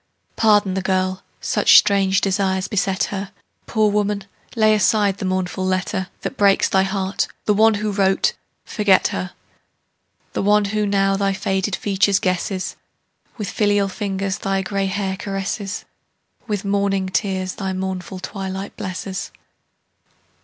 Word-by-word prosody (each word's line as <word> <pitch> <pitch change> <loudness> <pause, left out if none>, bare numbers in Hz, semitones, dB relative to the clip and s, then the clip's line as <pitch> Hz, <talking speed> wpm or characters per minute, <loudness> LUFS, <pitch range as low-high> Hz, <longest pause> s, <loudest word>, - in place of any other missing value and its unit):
Pardon 205 -3 +3
the 190 - -1
girl; 185 0 0 0.2
such - - +5
strange 195 -1 +4
desires 190 -1 0
beset 195 -2 0
her. 195 0 -4 0.4
Poor 215 -2 +2
woman, 205 -1 0 0.3
lay 215 -1 +4
aside 205 -1 +2
the - - -3
mournful 185 0 -1
letter 185 +1 -1
That - - -5
breaks 200 -1 +4
thy 190 - +3
heart; 195 0 -1 0.2
the 210 - +3
one 220 +1 +4
who 210 +1 -2
wrote, 195 -1 +2 0.3
forget 205 -3 +3
her: 90 0 -4 1.0
The - - -1
one 210 +1 +3
who 210 +1 0
now 195 -1 +2
thy 195 0 +1
faded 195 -1 -1
features 200 -1 +2
guesses, 185 0 -2 0.6
With 205 -4 -4
filial 205 -1 +2
fingers 195 -1 -3
thy 195 0 -1
gray 195 0 -1
hair 190 -1 -2
caresses, 195 0 -4 0.6
With 205 -3 -2
morning 200 -1 0
tears 190 -1 -1
thy 195 -1 -3
mournful 190 0 -4
twilight 190 0 -5
blesses. 185 0 -5
195 Hz, 140 wpm, -21 LUFS, 190-205 Hz, 1.0 s, such